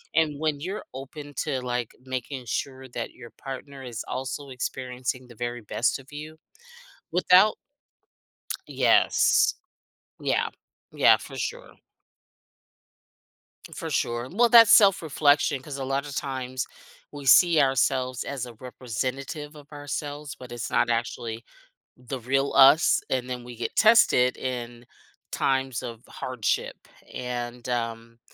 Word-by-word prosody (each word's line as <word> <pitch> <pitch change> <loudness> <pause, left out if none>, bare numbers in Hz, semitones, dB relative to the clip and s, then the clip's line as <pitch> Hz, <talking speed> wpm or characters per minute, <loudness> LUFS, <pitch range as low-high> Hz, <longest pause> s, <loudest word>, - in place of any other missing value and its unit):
And 150 -2 +2
when 155 -2 0
you're 190 +6 -5
open 145 +2 -9
to, 130 - -2
like, 125 -2 -3
making 130 0 -5
sure 130 +3 -4
that 120 -1 -5
your 120 - -12
partner 135 0 -8
is 120 -3 -6
also 135 +2 -4
experiencing 125 0 -4
the 120 - -14
very 120 +1 -4
best 115 +3 0
of 135 +1 -16
you 155 +1 -8 0.7
without 185 +3 +5 1.1
Yes. - - +4 0.7
Yeah, - - +1 0.4
yeah, - - +6
for - - -10
sure. - - -5 2.0
For 165 -2 -5
sure. 120 -3 -1
Well, 235 +6 +3
that's 230 -1 +8
self-reflection 155 - +4
'cause 140 0 -7
a 135 - -4
lotta 140 +2 -2
times 130 -2 -3 0.5
we 145 -1 -8
see 165 +4 +7
ourselves 130 -1 +1
as 135 -3 -4
a 120 - -10
representative 130 - -5
of 145 -1 -15
ourselves, 145 0 -5
but 125 -1 -12
it's 120 - -5
not 120 - +2
actually 115 -1 -2 0.5
the 125 +1 -6
real 135 +3 0
us 140 +4 +6
and 130 -1 -1
then 125 -1 -4
we 120 0 -10
get 120 - -4
tested 215 - +5
in 120 -2 -5 0.5
times 130 -3 0
of 115 -2 -7
hardship, 125 -4 -3 0.3
and, 120 0 -5
um, 115 -1 -3
130 Hz, 125 wpm, -26 LUFS, 120-145 Hz, 2.0 s, that's